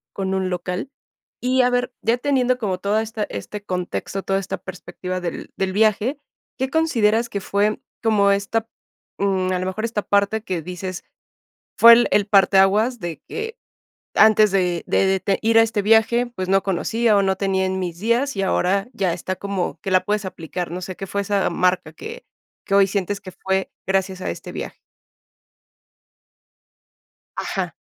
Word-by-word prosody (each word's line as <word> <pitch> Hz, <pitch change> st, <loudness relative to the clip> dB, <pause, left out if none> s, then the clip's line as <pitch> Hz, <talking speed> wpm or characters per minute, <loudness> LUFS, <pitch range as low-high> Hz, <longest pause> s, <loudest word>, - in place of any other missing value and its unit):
Con 190 Hz, -1 st, -2 dB
un 190 Hz, -1 st, 0 dB
local, 180 Hz, +6 st, -3 dB, 0.5 s
y 255 Hz, +1 st, +2 dB
a 250 Hz, -, +3 dB
ver 245 Hz, 0 st, 0 dB
ya 230 Hz, +2 st, +2 dB
teniendo 255 Hz, -1 st, +1 dB
como 195 Hz, -6 st, -2 dB
toda 205 Hz, +3 st, 0 dB
esta, 220 Hz, -1 st, -3 dB
este 200 Hz, -, -7 dB
contexto, 185 Hz, +1 st, -3 dB
toda 195 Hz, 0 st, 0 dB
esta 195 Hz, -1 st, -4 dB
perspectiva 185 Hz, 0 st, -6 dB
del 175 Hz, -2 st, -5 dB
del 190 Hz, -1 st, -1 dB
viaje, 220 Hz, +6 st, +2 dB, 0.4 s
¿qué 265 Hz, 0 st, -1 dB
consideras 235 Hz, -8 st, +2 dB
que 200 Hz, -, -4 dB
fue 205 Hz, +2 st, 0 dB, 0.2 s
como 210 Hz, -3 st, +3 dB
esta, 200 Hz, +3 st, 0 dB, 0.5 s
mm, 190 Hz, -2 st, 0 dB
a 185 Hz, -, 0 dB
lo 185 Hz, -, -3 dB
mejor 200 Hz, +4 st, -3 dB
esta 225 Hz, -2 st, -1 dB
parte 200 Hz, +2 st, +1 dB
que 185 Hz, -6 st, -3 dB
dices, 180 Hz, +1 st, -6 dB, 0.7 s
fue 235 Hz, 0 st, +10 dB
el 235 Hz, +1 st, +6 dB
el 205 Hz, -1 st, +3 dB
parteaguas 200 Hz, +4 st, +4 dB
de 170 Hz, -3 st, -5 dB
que 450 Hz, +2 st, -5 dB, 0.6 s
antes 215 Hz, -1 st, +6 dB
de 180 Hz, -3 st, 0 dB
de 190 Hz, -1 st, +2 dB
de 195 Hz, -, +1 dB
ir 225 Hz, +1 st, +5 dB
a -, -, +8 dB
este 220 Hz, -2 st, 0 dB
viaje, 225 Hz, +3 st, +4 dB
pues 185 Hz, 0 st, -3 dB
no 195 Hz, 0 st, +3 dB
conocía, 220 Hz, +4 st, +1 dB
o -, -, +4 dB
no 190 Hz, -1 st, +1 dB
tenía 190 Hz, -1 st, 0 dB
en 190 Hz, 0 st, -1 dB
mis 175 Hz, -2 st, -4 dB
días 235 Hz, +4 st, +1 dB
y 195 Hz, -, -1 dB
ahora 195 Hz, +2 st, +1 dB
ya 190 Hz, -6 st, 0 dB
está 185 Hz, +2 st, -4 dB
como 195 Hz, -4 st, -3 dB
que 195 Hz, -, -4 dB
la 185 Hz, 0 st, +4 dB
puedes 210 Hz, -1 st, -1 dB
aplicar?, 175 Hz, -1 st, -5 dB
no 180 Hz, +1 st, -5 dB
sé, 185 Hz, +1 st, -6 dB
¿qué 195 Hz, -, -6 dB
fue 200 Hz, +1 st, -2 dB
esa 200 Hz, -1 st, 0 dB
marca 180 Hz, -3 st, 0 dB
que 470 Hz, -, -9 dB, 0.4 s
que 195 Hz, -, -3 dB
hoy 200 Hz, -1 st, +6 dB
sientes 200 Hz, 0 st, -2 dB
que 190 Hz, -2 st, -10 dB
fue 190 Hz, +1 st, -2 dB
gracias 190 Hz, -1 st, -1 dB
a -, -, -3 dB
este -, -, -8 dB
viaje? -, -, -6 dB, 2.6 s
Ajá. -, -, -3 dB
200 Hz, 175 wpm, -22 LUFS, 185-220 Hz, 2.6 s, fue